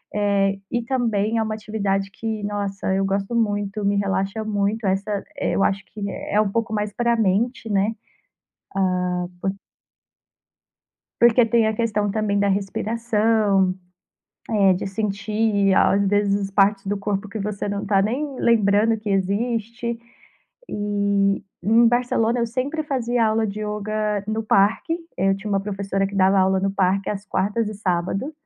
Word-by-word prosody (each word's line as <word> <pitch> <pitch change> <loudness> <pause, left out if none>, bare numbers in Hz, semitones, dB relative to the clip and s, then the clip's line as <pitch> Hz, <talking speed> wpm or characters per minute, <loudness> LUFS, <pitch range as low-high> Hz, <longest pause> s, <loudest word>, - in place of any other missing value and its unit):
Eh, 200 -1 +1
e 240 - 0
também 230 -3 0
é 225 - +2
uma 215 0 -3
atividade 200 -2 -2
que, 220 +1 -4
nossa, 200 -2 -2
eu 195 0 +1
gosto 195 +4 -1
muito, 205 -2 -1
me 200 0 +2
relaxa 195 +2 -1
muito. 210 0 -1
Essa, 195 +1 -1
eh, - - -1
eu 195 - +1
acho 195 0 0
que 200 -1 -6
é 210 +1 0
pouco 230 +1 -1
mais 210 -1 -1
pra 235 +2 +1
mente, 225 +3 0
né? 205 +2 +1 1.3
Ah, - - -2 0.2
por 195 - 0 1.7
porque 235 0 +6
tem 230 -1 +3
a 220 - 0
questão 210 -3 0
também 210 -1 0
da 200 - +2
respiração, 210 -1 +1 0.8
eh, 200 -4 +4
de 180 - -3
sentir, 205 0 0
às 200 +1 +3
vezes, 200 0 +1
partes 195 0 +3
do 205 +1 0
corpo 200 0 -2
que 215 - -5
você 205 0 -3
não 200 0 -2
está 195 -1 +2
nem 265 +7 -2
lembrando 220 -1 +3
que 215 -1 -6
existe. 230 +4 -1 0.7
E 200 -1 0 0.2
em 225 +5 +5
Barcelona, 240 -1 +1
eu 235 - +1
sempre 265 +7 -2
fazia 245 -5 0
aula 220 0 +1
de 210 +1 -5
yoga 210 0 -2
no 220 +1 -1
parque. 215 +10 +2 0.2
Eu 195 +1 +2
tinha 210 +2 -6
uma 195 -1 +2
professora 195 -1 -2
que 200 - -8
dava 195 0 +4
aula 190 0 +3
no 195 +1 0
parque 195 0 +1
às 200 -1 -4
quartas 205 +4 0
e - - -7
sábado. 195 - -2
205 Hz, 155 wpm, -22 LUFS, 195-225 Hz, 1.7 s, porque